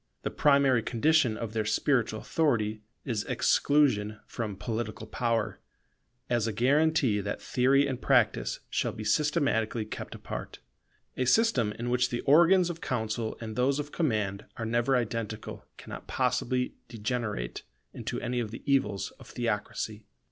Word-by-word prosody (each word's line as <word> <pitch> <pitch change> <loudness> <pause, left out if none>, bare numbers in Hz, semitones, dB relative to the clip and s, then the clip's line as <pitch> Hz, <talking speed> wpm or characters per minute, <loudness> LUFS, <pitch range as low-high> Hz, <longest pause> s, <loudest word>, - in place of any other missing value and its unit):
The - - -2
primary 140 -4 +4
condition 130 -1 +2
of 110 -2 -5
their 110 -1 0
spiritual 110 -1 +1
authority 110 -10 0 0.2
is 115 -5 -1
exclusion 120 -8 +2
from 110 -4 -4
political 110 0 -4
power, 115 -2 -1 0.7
as 120 -2 +1
a - - 0
guarantee 135 0 +2
that 100 +1 -4
theory 135 +3 +3
and 130 -2 -3
practice 125 -5 +2
shall - - 0
be 110 - -6
systematically 120 -3 +1
kept 105 - -7
apart. - - -7 0.6
A 130 - +1
system 130 - +3
in 120 +2 -4
which 125 0 +2
the 120 - -2
organs 170 +5 +5
of 165 - -9
counsel 110 -2 -2
and 110 -1 -6
those 135 +3 +2
of 150 0 -4
command 105 - -1
are 115 - -3
never 120 +4 +2
identical 115 -2 -3
cannot - - -9
possibly 125 +1 0
degenerate 110 - -3 0.3
into - - -4
any 120 0 -1
of 115 -3 -2
the 115 - -9
evils 130 -8 +1
of - - -13
theocracy. 110 -2 -3
120 Hz, 145 wpm, -29 LUFS, 110-135 Hz, 0.7 s, organs